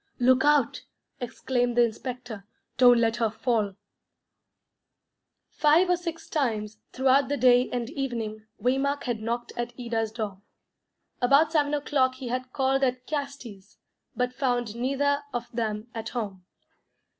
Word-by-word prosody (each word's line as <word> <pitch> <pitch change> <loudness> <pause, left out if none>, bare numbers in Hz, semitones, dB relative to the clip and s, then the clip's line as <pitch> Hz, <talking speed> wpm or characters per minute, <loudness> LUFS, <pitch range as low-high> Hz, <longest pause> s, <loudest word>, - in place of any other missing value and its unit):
"Look 255 +1 +4
out," 295 -4 +3 0.4
exclaimed 245 -1 -1
the 240 - +7
inspector. 235 -2 -4 0.3
"Don't 245 -2 +7
let 230 0 +2
her 230 -2 +1
fall." 220 -3 -1 1.8
Five 320 +5 +4
or - - +5
six 335 -2 -6
times, 215 -7 -2
throughout 265 +1 +3
the 285 - 0
day 250 0 +5
and 245 -2 -2
evening, 225 -6 -4
Waymark 270 +3 0
had 240 -4 -2
knocked 235 +2 -3
at 240 0 -3
Ida's 225 -2 -2
door. 210 -4 -5 0.8
About 280 +6 +5
seven 295 -2 +2
o'clock 270 -3 +1
he 260 -2 -6
had 255 +1 -3
called 270 +1 +1
at 255 -1 0
the - - -16
Castis', 250 -9 -7 0.4
but 250 +1 -1
found 245 -4 -1
neither 275 +3 +1
of 240 - -3
them 215 -2 -2
at 225 -1 -5
home. 200 -7 -5
245 Hz, 140 wpm, -27 LUFS, 230-270 Hz, 1.8 s, the